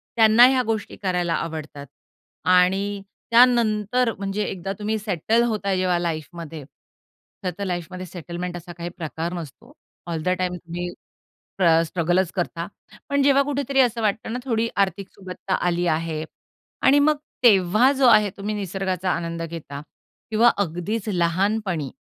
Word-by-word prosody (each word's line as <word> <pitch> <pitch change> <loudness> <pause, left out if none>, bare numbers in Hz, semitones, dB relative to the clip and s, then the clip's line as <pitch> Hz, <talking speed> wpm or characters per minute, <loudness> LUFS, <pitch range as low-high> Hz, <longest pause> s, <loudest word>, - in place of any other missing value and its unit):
त्यांना 225 +1 +7
ह्या 260 -1 +2
गोष्टी 220 -2 -3
करायला 180 -3 0
आवडतात. 155 -4 -5 0.6
आणि 190 +3 +3 0.3
त्यानंतर 235 -1 +4
म्हणजे 195 +1 -2
एकदा 195 0 -4
तुम्ही 215 +1 -1
सेटल 215 +3 +1
होता 200 -3 -1
जेव्हा 185 -1 +1
लाईफमध्ये, 165 -1 -5 0.8
खरंतर 185 +2 -3
लाईफमध्ये 180 0 -4
सेटलमेंट 175 0 -6
असा 175 0 -10
काही 170 0 -5
प्रकार 165 +1 -4
नसतो. 175 - -9 0.3
ऑल 165 -2 -3
द - - 0
टाईम 180 -1 -1
तुम्ही 175 0 -5 0.5
स्ट्र 165 -3 +2
स्ट्रगलच 175 +2 0
करतात. 170 -1 -2 0.4
पण 280 0 +2
जेव्हा 280 0 +5
कुठेतरी 280 -1 0
असं 240 -2 +2
वाटतं 220 +1 -1
ना, 245 - -2
थोडी 230 -2 0
आर्थिक 195 -1 0
सुबत्ता 185 0 -5
आली 175 0 +1
आहे 160 -1 -1 0.6
आणि 285 +2 +6
मग 305 +1 +4 0.3
तेव्हा 215 +3 +5
जो 270 -2 +2
आहे 210 -3 +6
तुम्ही 205 +2 -3
निसर्गाचा 190 -2 -2
आनंद 170 -1 -2
घेता 160 -4 -7 0.5
किंवा 225 +2 +5
अगदीच 200 +4 -2
लहानपणी, 180 -3 0
185 Hz, 140 wpm, -23 LUFS, 170-220 Hz, 0.8 s, त्यांना